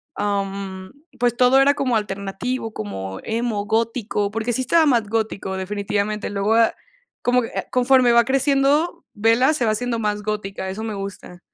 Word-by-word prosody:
am, 195 0 -3 0.3
pues 240 -1 +2
todo 250 +2 +5
era 285 +1 +5
como 255 -5 0
alternativo, 210 +4 -4
como 95 -2 -5
emo, 225 -2 -2
gótico, 220 -2 -1
porque 225 +2 -2
sí 260 - 0
estaba 320 +5 +3
más 235 -7 +2
gótico 215 -4 -2
definitivamente. 205 +2 -2
Luego 205 +2 +1
de 230 - +6
ah, - - -8 0.5
como 250 0 +2
que 230 - -6
ah, - - -3
conforme 250 -1 +4
va 235 0 +6
creciendo, 275 +6 +1
Bella 230 +5 +3
se 255 -6 0
va 220 - +2
haciendo 235 +1 -1
más 210 -1 -2
gótica, 195 -2 -4
eso 200 +4 -5
me 220 - -3
gusta. 195 -2 -7
220 Hz, 170 wpm, -21 LUFS, 200-245 Hz, 0.5 s, de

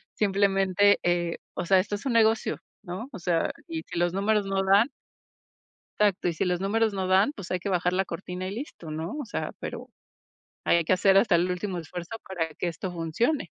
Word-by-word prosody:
Simplemente, 200 0 +3
eh, 175 -1 +1 0.2
o - - -3
sea, 190 +1 +5
esto 205 +2 -1
es 205 - -8
un 260 - 0
negocio, 225 -1 +3 0.2
¿no? 200 +7 -6
O 200 - -7
sea, 170 -1 +1 0.2
y 160 -1 -4
si - - -7
los 175 0 +1
números 205 +1 +1
no 195 0 0
dan 200 +7 +5 1.1
exacto, 205 -4 +2
y 170 - +1
si 160 - -1
los 180 0 0
números 220 +2 +1
no 190 -1 -1
dan 190 +9 +4
pues 200 -8 -9
hay 185 - 0
que 200 - -4
bajar 180 -1 +1
la 190 +1 +1
cortina 180 +1 -5
y - - -4
listo, 225 - -7
¿no? 160 +3 -4
O - - -4
sea, 230 - -4
pero - - -6 0.8
ahí - - +4
hay 170 - +1
que 160 - +2
hacer 195 +1 +4
hasta 195 -3 +4
el 175 +2 +2
último 180 +1 -2
esfuerzo 175 +6 -7
para 165 -4 -3
que 175 - -2
esto 175 +2 -4
funcione. 180 - 0
190 Hz, 215 wpm, -27 LUFS, 175-205 Hz, 1.1 s, sea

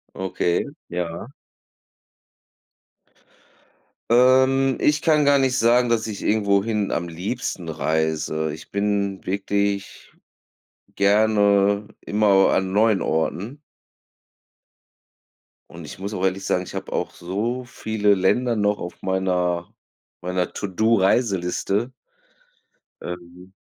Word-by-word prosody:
Okay, 90 -2 -1 0.2
ja. 85 +6 -5 2.8
Ähm. 130 +2 +5 0.3
Ich 150 +1 +2
kann 155 -3 +3
gar 140 0 +5
nicht 130 -1 +1
sagen, 120 +1 +3
dass 115 -1 +1
ich 105 -2 -6
irgendwohin 105 0 +1
am 85 +1 -1
liebsten 90 0 -4
reise. 80 0 -1
Ich 75 - -11
bin 100 -1 -1
wirklich 100 +1 -2 0.8
gerne 100 0 +3
immer 105 +1 0
au 95 -1 +5
an 95 0 +1
neuen 105 -1 +3
Orten. 100 - -2 2.1
Und - - -10
ich - - -10
muss 100 +2 -5
auch 90 - -3
ehrlich 95 +1 -1
sagen, 90 - 0
ich - - -11
habe - - -6
auch - - -2
so 110 +8 -3
viele 110 -3 0
Länder 115 +6 +1
noch 105 -1 +1
auf 90 - -8
meiner 90 -2 -1 0.5
meiner 90 0 -2
To-Do-Reiseliste. 100 +1 0 1.1
Ähm. 90 +1 -9
100 Hz, 105 wpm, -22 LUFS, 90-110 Hz, 2.8 s, Ähm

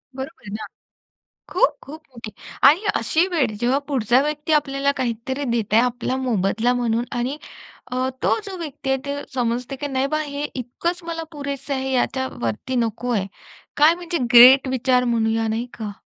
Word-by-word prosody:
बरोबर 270 +5 -7
आहे 205 - -9
ना. - - -5 0.9
खूप-खूप 315 - 0
मोठी. 230 -3 -9 0.3
आणि 315 +10 +6
अशी 330 +3 +2
वेळ, 330 -9 +1
जेव्हा 245 +4 +2
पुढचा 250 -2 +2
व्यक्ती 300 +1 -2
आपल्याला 280 -1 +1
काहीतरी 260 +3 -2
देत 225 -3 -1
आहे 225 - +6
आपला 250 +1 -1
मोबदला 230 -1 +1
म्हणून 240 -1 0
आणि 260 +5 -2 0.5
अ, 255 +1 0
तो - - +3
जो 390 -2 -6
व्यक्ती 295 -5 -6
आहे, 270 - +2
ते 280 - -2 0.2
समजते 245 +1 -2
की 290 +2 -4
नाही 270 0 0
बा, 305 +2 -1
हे 285 -1 -5
इतकंच 335 +9 -3
मला 330 -1 -4
पुरेसं 280 -1 -5
आहे, 265 0 -2
याच्यावरती 260 - -2
नको 235 0 -1
आहे. 200 -4 0 0.5
काय 300 +3 +6
म्हणजे 345 -1 -3 0.2
ग्रेट 260 +3 +9
विचार 255 0 +2
म्हणूया, 225 -1 +1
नाही 225 +2 -1
का? 215 -2 -5
260 Hz, 165 wpm, -22 LUFS, 235-290 Hz, 0.9 s, ग्रेट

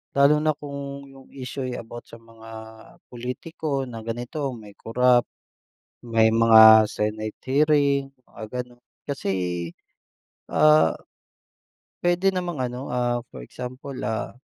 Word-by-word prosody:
Lalo 140 +2 +5
na 155 -1 +1
kung 140 -1 -7
yung 135 -1 -16
issue, 130 0 -5
eh, 125 - -4
about 120 +1 -9
sa - - -12
mga 115 0 -15 0.6
pulitiko 135 +3 -4
na 120 -3 -7
ganito, 120 +5 -4
may 105 -2 -12
korap, 125 +1 +2 0.8
may 115 -1 +3
mga 110 -1 +8
Senate 110 0 -3
hearing 140 -1 +2 0.2
mga 110 - -10 0.2
ganun, 120 0 -16 0.3
kasi, 135 -8 -2 1.2
ah, 155 - +4 1.1
puwede 180 +2 +2
namang 175 -8 -2
ano, 125 +3 -7
ah, 120 -1 0
for - - -10
example, 130 - -8
ah, 110 +1 -3
125 Hz, 120 wpm, -24 LUFS, 115-140 Hz, 1.2 s, mga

